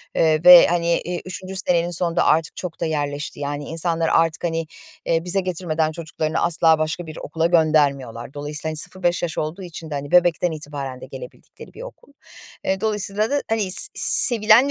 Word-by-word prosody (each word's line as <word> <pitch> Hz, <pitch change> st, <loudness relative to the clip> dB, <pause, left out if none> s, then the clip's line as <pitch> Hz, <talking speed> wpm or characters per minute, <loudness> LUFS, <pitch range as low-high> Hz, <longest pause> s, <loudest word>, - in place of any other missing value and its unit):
eee, 155 Hz, -1 st, +2 dB
ve, 180 Hz, -1 st, +9 dB
hani, 170 Hz, 0 st, 0 dB
eee, 175 Hz, 0 st, -5 dB
3'üncü 185 Hz, +1 st, -7 dB
senenin 175 Hz, -2 st, 0 dB
sonunda 170 Hz, 0 st, +1 dB
artık 160 Hz, 0 st, +1 dB
çok 180 Hz, -3 st, -7 dB
da -, -, -1 dB
yerleşti. 145 Hz, -2 st, -3 dB
Yani, 145 Hz, 0 st, -4 dB
insanlar 165 Hz, +1 st, -1 dB
artık, 165 Hz, -1 st, +1 dB
hani, 165 Hz, -1 st, -2 dB, 0.4 s
eee, 165 Hz, 0 st, 0 dB
bize 180 Hz, +2 st, +1 dB
getirmeden 165 Hz, -4 st, -2 dB
çocuklarını 160 Hz, -1 st, -4 dB
asla 160 Hz, -1 st, +3 dB
başka 155 Hz, +3 st, -3 dB
bir 155 Hz, -1 st, -10 dB
okula 160 Hz, +2 st, -2 dB
göndermiyorlar. 140 Hz, -8 st, +1 dB
Dolayısıyla, 150 Hz, +2 st, -5 dB
hani, 155 Hz, -, -4 dB
0-5 175 Hz, +2 st, -1 dB
yaş 170 Hz, -2 st, -3 dB
olduğu 155 Hz, +5 st, -4 dB
için 165 Hz, -2 st, -9 dB
de, -, -, -6 dB
hani, 140 Hz, 0 st, -6 dB
bebekten 175 Hz, -1 st, +3 dB
itibaren 145 Hz, -4 st, -7 dB
de -, -, -8 dB
gelebildikleri -, -, -12 dB
bir -, -, -11 dB
okul. -, -, -13 dB, 0.5 s
Eee, 190 Hz, 0 st, -1 dB
dolayısıyla 210 Hz, 0 st, -1 dB
da, 285 Hz, -, +1 dB
hani, 215 Hz, -4 st, -1 dB
s 415 Hz, -, +5 dB
sevilen 235 Hz, +2 st, +4 dB
165 Hz, 180 wpm, -21 LUFS, 155-180 Hz, 0.5 s, ve